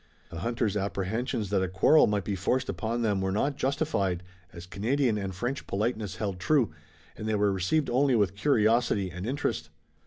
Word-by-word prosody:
The 85 - -6
hunter's 115 0 -1
apprehensions 100 +2 -2
that 100 -2 +2
a 95 - 0
quarrel 95 - +5
might 105 -2 0
be 100 - -2
forced 100 +7 0
upon 110 +5 -2
them 100 -3 +1
were 95 0 0
not 140 +8 0
justified, 130 - -1 0.3
as 85 0 -10
Canadian 115 +6 0
and 95 -1 -3
French 120 +8 -3
politeness 105 -1 -2
held 100 -4 -3
true, 125 - +2 0.4
and 110 - -6
they 110 - +1
were 105 -1 +2
received 95 - +1
only 130 +1 +3
with 100 -4 +2
curiosity 110 -4 +2
and 90 +5 -6
interest. 80 - -2
105 Hz, 180 wpm, -28 LUFS, 95-120 Hz, 0.4 s, quarrel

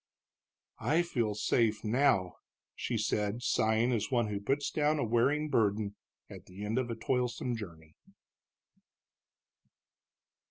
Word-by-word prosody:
"I 165 +3 +2
feel 120 -11 -1
safe 110 +1 +1
now," 110 -6 +2 0.4
she 120 - -3
said, 105 +2 -1
sighing 110 +1 +2
as 110 -4 -1
one 120 -4 +1
who 100 -1 -2
puts 135 +8 -1
down 150 0 +1
a 145 - 0
wearing 125 +7 +2
burden 105 -5 +1 0.3
at - - -12
the 100 +3 -8
end 110 +4 0
of 125 -2 -2
a 115 - -2
toilsome 125 +1 -1
journey. 80 -8 -10
115 Hz, 125 wpm, -31 LUFS, 105-125 Hz, 0.4 s, I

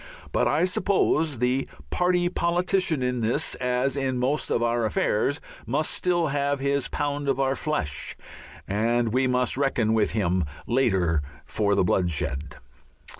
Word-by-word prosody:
But - - +2
I - - +2
suppose 170 -6 +1
the 125 +3 0 0.2
party 180 0 +2
politician 175 -3 0
in 125 0 0
this, 115 +1 0
as 125 +2 0
in 135 -2 -1
most 135 +5 0
of 120 - +1
our 120 0 +1
affairs, 110 +6 0 0.3
must 145 +7 0
still 175 -3 +1
have 140 0 0
his 140 0 0
pound 145 0 -2
of 135 -1 0
our 135 0 +1
flesh 75 - -2 0.5
and 115 +3 +1
we 130 +1 +2
must 125 0 +1
reckon 130 -6 +1
with 110 -2 +2
him 90 -4 +1 0.2
later 95 - +2 0.2
for 100 -2 0
the - - +3
bloodshed. 80 -6 -1
130 Hz, 145 wpm, -25 LUFS, 110-145 Hz, 0.5 s, the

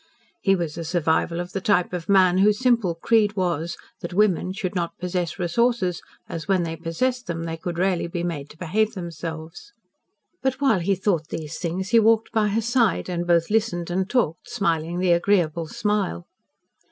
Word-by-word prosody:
He 195 -1 +3
was 170 -3 -3
a - - -3
survival 170 0 0
of 175 0 -5
the 195 - -3
type 185 -3 +2
of 175 0 -5
man 185 -2 +5
whose 205 +1 +4
simple 235 -9 +2
creed 210 +3 +2
was 170 -3 -1 0.2
that 175 +1 -6
women 190 -3 +2
should 190 -1 -3
not 175 -3 -3
possess 180 -2 -2
resources, 185 0 +1 0.3
as 165 -1 -6
when 190 -3 +2
they 165 -1 -3
possessed 245 +11 -2
them 165 -1 -3
they 165 -1 -3
could 170 +1 -5
rarely 180 -1 +1
be 170 0 -4
made 150 -5 -4
to - - -15
behave 215 +6 0
themselves. 165 - -7 0.7
But 265 0 -1
while 270 -9 +3
he 195 +3 +1
thought 180 -5 0
these 155 -2 -5
things, 185 +2 -3
he 230 0 +6
walked 225 0 +3
by 220 -2 +2
her 210 +2 0
side 235 -6 +1
and 175 -1 -2
both 170 +1 +2
listened 185 -6 0
and 190 +2 -1
talked 230 - 0
smiling 170 -5 -1
the 180 0 +2
agreeable 170 -3 +2
smile. 205 - -1
180 Hz, 185 wpm, -24 LUFS, 170-210 Hz, 0.7 s, he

